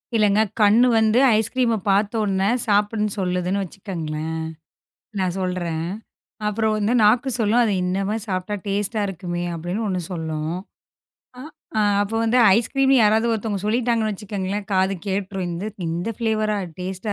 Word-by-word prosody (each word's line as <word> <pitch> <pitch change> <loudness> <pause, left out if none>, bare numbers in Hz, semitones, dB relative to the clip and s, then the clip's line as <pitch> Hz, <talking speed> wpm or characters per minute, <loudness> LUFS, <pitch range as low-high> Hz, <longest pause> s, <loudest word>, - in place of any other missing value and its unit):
இல்லங்க. 210 -1 +4 0.2
கண்ணு 220 +5 +6
வந்து 220 +2 +3 0.2
ஐஸ்கிரீம 230 +1 +1
பார்த்தவுடனே 200 -1 +1 0.2
சாப்பிடன்னு 210 0 +1
சொல்லுதுன்னு 180 +1 -1
வச்சுக்கங்களேன். 160 -4 -5 0.9
நான் 185 -1 0
சொல்றேன். 175 -3 -2 0.6
அப்புறம் 215 +1 0
வந்து 210 +3 +1
நாக்கு 245 +5 +4
சொல்லும் 225 +2 +3
அத 220 -3 +2
இன்னம 195 +4 -1
சாப்பிட்டா 190 0 -2
டேஸ்ட்டா 205 +2 -1
இருக்குமே 175 -1 -4
அப்டின்னு 175 +7 -3
ஒண்ணு 185 -2 -1
சொல்லும். 160 -1 -3 1.3
அ, - - +4 0.2
அப்ப 205 +2 -5
வந்து 240 +3 +3 0.2
ஐஸ்கிரீம் 270 +3 +2
யாராது 220 +2 +3
ஒருத்தவங்க 210 -3 -2
சொல்லிட்டாங்கன்னு 225 -1 +1
வச்சுக்கங்களேன் 200 0 -4
காது 190 +1 +2
கேட்ருக்கும் 195 -1 -2
இந்த 180 +5 -4 0.2
இந்த 175 +6 -3
ஃப்லேவரா 215 -2 0 0.2
டேஸ்ட்டா 190 +3 -4
205 Hz, 125 wpm, -22 LUFS, 185-220 Hz, 1.3 s, கண்ணு